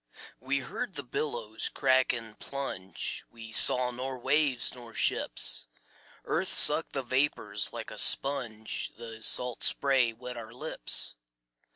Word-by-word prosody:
We 140 +1 -1
heard 190 - -6
the 145 - -4
billows 115 -5 -4
crack 130 -1 +2
and 115 -3 -7
plunge, 95 -10 -5
We 115 -1 -11
saw 125 +2 +5
nor 130 +2 -5
waves 135 0 +2
nor 120 -2 -12
ships. - - -1 0.6
Earth - - -1
sucked - - +6
the 135 - -2
vapors 120 -5 0
like - - -7
a - - -4
sponge, 120 -6 +2
The 115 -1 -10
salt 125 +2 +1
spray 135 -4 +3
wet 125 +2 -9
our 110 -2 -8
lips. - - -2
125 Hz, 135 wpm, -29 LUFS, 115-135 Hz, 0.6 s, sucked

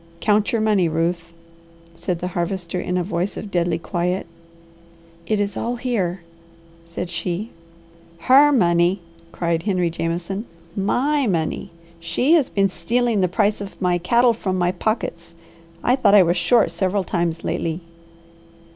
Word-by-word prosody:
"Count 210 0 +2
your 230 - +1
money, 205 -6 +2
Ruth?" 170 +1 -1 0.6
said 170 +1 -3
the 180 +2 -4
Harvester 175 0 -3
in 180 0 -2
a 180 - 0
voice 175 +1 -2
of 205 - -7
deadly 170 -2 +1
quiet. 180 +2 -2 1.0
"It 215 -1 +1
is 200 -1 -1
all 240 +1 -2
here," 200 -8 -2 0.6
said 170 +1 -6
she. 180 +5 -3 0.7
"Her 275 - +6
money?" 175 -5 +3 0.3
cried 170 -2 -1
Henry 180 -3 0
Jameson. 170 +5 -3 0.3
"My 265 +8 +1
money! 165 -5 -1 0.3
She 170 - 0
has 315 -6 +4
been 195 -1 +2
stealing 225 +5 0
the 185 - +3
price 205 +3 0
of 200 - -8
my 180 -1 +1
cattle 235 +7 +3
from 190 -4 -2
my 175 0 +2
pockets. 175 -4 -3 0.5
I 250 - +4
thought 235 -6 +4
I 200 - +8
was 175 0 +1
short 190 +6 +3
several 190 0 0
times 170 -2 -2
lately." 165 0 -2
185 Hz, 145 wpm, -21 LUFS, 170-215 Hz, 1.0 s, I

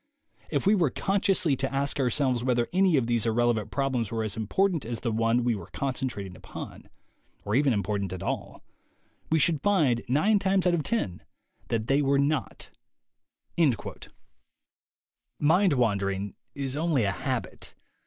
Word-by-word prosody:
If 145 -3 -1
we 200 - +5
were 175 -8 +3
consciously 190 - +1
to 135 - -2
ask 140 +1 -1
ourselves 130 -2 +1
whether 120 -2 +1
any 185 -4 +4
of 130 - +1
these 115 -1 +1
irrelevant 115 -2 +1
problems 130 -6 -1
were 115 -1 -2
as 110 -3 -3
important 165 - 0
as 115 0 -5
the 115 - -1
one 115 +2 +1
we 120 -1 +2
were 95 -5 -7
concentrating 125 -5 -3
upon, - - -10 0.6
or 105 - -2
even 140 +2 +3
important 100 -2 -1
at 95 -2 -6
all, - - -4 0.7
we 160 - +3
should 155 -1 +2
find, 150 - +2
nine 200 - +3
times 190 -1 +1
out 180 - +3
of 170 - +1
ten, 140 - -2 0.5
that 110 -2 -1
they 135 +4 +2
were 140 0 +2
not." 140 -1 -1 2.7
Mind 170 +4 +4
wandering 100 -5 0 0.2
is 135 -1 -3
only 155 -5 +1
a 100 - +1
habit. - - -4
130 Hz, 155 wpm, -27 LUFS, 115-155 Hz, 2.7 s, we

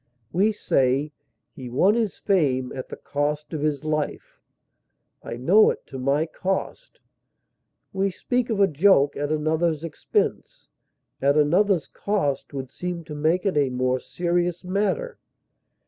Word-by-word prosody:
We 200 +6 +3
say, 135 -6 +1 0.4
"he 125 -2 -9
won 185 - +3
his 225 -3 -1
fame 135 -10 +1
at 130 - -6
the - - -6
cost 150 +2 -3
of 155 - -3
his 150 -2 -1
life;" 155 -1 -3 0.8
"I 115 - -6
know 185 - +5
it - - -4
to 135 - -8
my 140 +4 +1
cost;" 195 - -4 0.9
we 195 +1 +1
speak 245 +6 -2
of 220 -3 -1
a 200 - +6
joke 150 -3 +4
at 145 +1 -2
another's 155 +1 0
expense; 165 -3 -2 0.5
at 140 +2 +3
another's 175 +4 +3
cost 145 -10 -2
would 135 -2 -6
seem 180 -1 -5
to 155 -1 -9
make 160 +5 +1
it 195 - +1
a 140 -2 +3
more 130 0 0
serious 175 +3 -1
matter. 210 - -1
155 Hz, 145 wpm, -24 LUFS, 140-190 Hz, 0.9 s, a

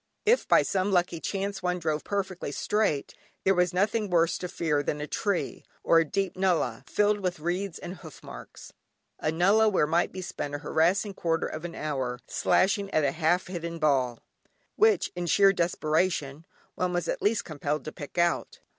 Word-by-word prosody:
If 470 +3 +3
by - - +5
some 195 +1 0
lucky 175 -2 +1
chance 200 +3 -3
one 180 0 0
drove 155 -3 -2
perfectly 190 -6 -3
straight, 180 -4 0 0.3
there 195 - +4
was 180 -1 +2
nothing 210 +3 0
worse 170 -1 +2
to 180 - -4
fear 160 -4 0
than 150 +1 -2
a 150 - -3
tree, 200 +4 -2 0.2
or 165 - +5
a 165 - +2
deep 195 +4 -2
nullah, 170 -11 0
filled 210 +4 +2
with 180 -4 -2
reeds 175 +3 -2
and 180 +2 -8
hoof 160 -4 -13
marks, - - -11 0.5
a 155 - 0
nullah 200 +7 +4
where 190 -7 +2
might 165 +3 +1
be 185 - -6
spent 145 -4 -5
a 145 - -8
harassing 190 +6 +2
quarter 165 -3 -1
of 155 +2 -5
an 170 - -6
hour, 130 -5 -2
slashing 200 +1 +1
at 155 - +1
a 140 - +2
half 165 +4 +1
hidden 170 -2 -5
ball, 135 -6 +1 0.6
which, 435 0 +3
in 175 -1 -3
sheer 195 +3 +5
desperation, 160 -3 0 0.3
one 180 0 -1
was 175 -1 -1
at - - -2
last 210 0 +1
compelled 150 -1 -3
to 155 - -5
pick 145 +3 -10
out. 170 0 0
175 Hz, 185 wpm, -27 LUFS, 155-195 Hz, 0.6 s, by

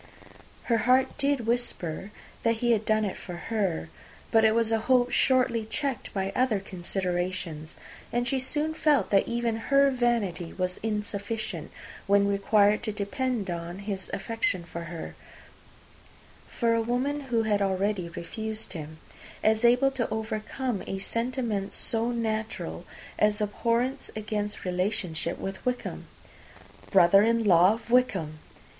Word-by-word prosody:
Her 230 -2 +2
heart 260 +1 +4
did 280 -4 +1
whisper 210 -7 -1 0.3
that 230 0 +2
he 240 +1 +1
had 220 -2 +2
done 215 0 +2
it 195 - -3
for 180 - -7
her. 175 - -2 0.4
But 225 0 +5
it 220 0 +5
was 230 -1 +2
a 225 - +3
hope 250 -1 +4
shortly 250 -3 +3
checked 265 +4 -3
by 195 -1 -2
other 250 -5 +2
considerations; 180 -3 -3 0.3
and 240 0 0
she 265 +2 +1
soon 295 +4 -1
felt 300 -3 +2
that 195 -1 +4
even 235 -1 -1
her 275 0 +5
vanity 230 -9 0
was 180 -1 -2
insufficient, 210 -3 -3 0.4
when 200 0 +4
required 200 +1 +3
to 215 - -2
depend 210 0 -2
on 170 +1 -5
his 200 -1 -5
affection 210 -4 -1
for 170 0 -7
her, 170 0 -7 1.3
for 230 -2 +1
a 230 - +2
woman 255 +5 -1
who 230 -2 +2
had 210 -2 +1
already 195 -1 0
refused 220 +6 -6
him, 160 -2 -7 0.5
as 220 +1 +3
able 250 +3 +5
to 260 -3 -2
overcome 220 +1 -3
a 195 - -3
sentiment 230 -2 -2
so 230 +1 0
natural 220 -2 -3 0.3
as 210 0 +3
abhorrence 235 +5 0
against 210 -1 -3
relationship 180 -2 -1
with 195 0 -6
Wickham. 250 0 -3 0.8
Brother 195 0 +6
in 230 +1 +3
law 185 +1 +6
of 230 +1 -11
Wickham! 190 -12 +2
215 Hz, 140 wpm, -27 LUFS, 195-240 Hz, 1.3 s, Brother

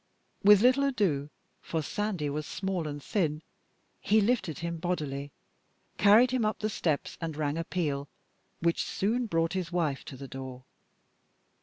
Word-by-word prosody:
With 205 0 +8
little 255 +4 +5
ado 190 - +1 0.3
for 160 -2 -2
Sandy 200 -4 -2
was 150 +1 -3
small 190 -4 -2
and 145 -1 -6
thin 155 -6 -1 0.6
he 215 - +3
lifted 200 - +1
him 170 0 -3
bodily, 150 -5 -3 0.7
carried 220 +5 +6
him 255 -3 +1
up 215 0 0
the 215 0 -2
steps, 155 -7 -1
and 160 -3 -4
rang 150 -1 0
a 165 - -1
peal 145 -5 -2 0.5
which 170 0 +2
soon 230 +5 0
brought 165 -3 +1
his 185 -2 -2
wife 160 -6 0
to 130 - -8
the 135 +1 -8
door. 130 -1 -8
170 Hz, 155 wpm, -29 LUFS, 150-205 Hz, 0.7 s, With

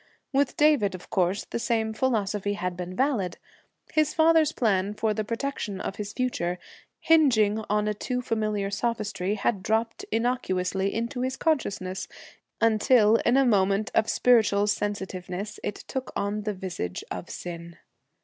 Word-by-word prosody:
With 275 0 +1
David, 290 -11 +3
of 180 - -12
course, 185 0 +1
the - - -4
same 220 -1 0
philosophy 210 -4 0
had 180 -3 -3
been 180 +1 -6
valid. 240 -10 0 0.6
His 310 -1 +2
father's 320 -1 +5
plan 205 -6 0
for 215 0 0
the 215 - -2
protection 230 -3 -3
of 195 - -4
his 205 -1 -4
future, 195 -8 -1 0.5
hingeing 225 -10 +4
on 210 0 +1
a 210 - +1
too 250 +4 -3
familiar 215 -3 -1
sophistry, 210 -4 -1
had 200 -1 0
dropped 225 +2 -1
innocuous 225 -6 0
into 230 +7 -1
his 260 +1 -2
consciousness, 200 - -1 0.5
until, 225 0 +4
in 240 +3 +2
a 275 - +5
moment 200 -2 +2
of 220 - +2
spiritual 220 -4 +4
sensitiveness, 200 -1 -3
it 205 - -2
took 265 -1 -6
on 205 +1 -1
the 210 - -1
visage 175 - -5
of - - -5
sin. 170 -1 -7
210 Hz, 150 wpm, -26 LUFS, 195-245 Hz, 0.6 s, father's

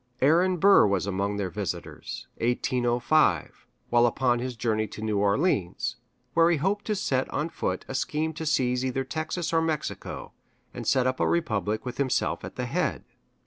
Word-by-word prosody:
Aaron 175 +7 +4
Burr 195 - +6
was 100 -2 0
among 100 +1 -1
their 95 -3 -2
visitors - - -5
(1805), 120 - +1 0.2
while 120 0 +5
upon 120 0 +1
his 125 0 -4
journey 110 -1 0
to 105 - -9
New 105 -2 0
Orleans, 100 - +1 0.4
where 165 0 +5
he 170 - +3
hoped 195 +7 -1
to 215 - 0
set 135 -10 0
on 150 +3 -2
foot 95 - -3
a - - -5
scheme 155 +4 -1
to 160 +1 -5
seize 125 -4 +1
either 130 +1 -1
Texas 155 +5 -3
or 165 - +4
Mexico, 160 -2 -3 0.4
and - - -6
set 130 -2 +3
up 130 0 0
a - - +2
republic 110 - 0
with 125 +1 -6
himself 135 -2 0
at - - -7
the - - -3
head. - - -1
130 Hz, 175 wpm, -27 LUFS, 110-160 Hz, 0.4 s, Burr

